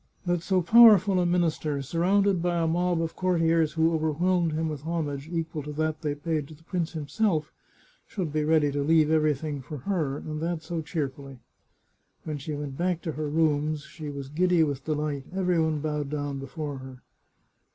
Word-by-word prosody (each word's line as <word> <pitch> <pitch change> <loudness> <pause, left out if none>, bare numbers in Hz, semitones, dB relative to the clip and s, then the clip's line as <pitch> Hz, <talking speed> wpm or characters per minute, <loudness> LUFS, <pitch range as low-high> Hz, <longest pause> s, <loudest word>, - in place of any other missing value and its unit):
That 175 -1 0
so 185 +1 +1
powerful 205 -1 +7
a 175 - +2
minister, 160 -4 0
sur 165 +5 -4
rounded 195 +1 +3
by 175 0 0
a 165 - +1
mob 175 +1 +1
of 160 - -4
courtiers 165 -4 +2
who 160 +1 +2
overwhelmed 165 +2 +1
him 160 +1 -1
with 150 -3 -4
homage 155 -3 -3
equal 165 -2 -3
to 150 +1 -7
that 155 +1 -2
they 150 -3 -1
paid 155 -1 -2
to 155 - -12
the 160 - -22
prince 170 -1 -3
himself, 160 +1 -1 0.5
should 175 -8 -4
be 155 -1 +1
ready 155 -2 +3
to 145 0 -1
leave 155 +1 +3
everything 150 -2 +1
for 150 +4 -7
her, 160 -9 -1
and 155 0 -6
that 165 -1 -2
so 165 0 -3
cheer 155 -2 -2
fully! 135 0 -11 0.9
When 150 -2 -4
she 150 +2 -5
went 145 -1 -6
back 175 -1 0
to 160 - -2
her 150 0 -3
rooms 150 -1 +1
she 155 0 -8
was 140 -2 -6
giddy 175 +2 +3
with 140 -3 -3
delight; 150 -3 -2
every 180 -3 +2
one 155 -2 0
bowed 150 -2 -2
down 145 -2 -3
before 140 0 -5
her. 130 -1 -11
155 Hz, 195 wpm, -27 LUFS, 145-170 Hz, 0.9 s, powerful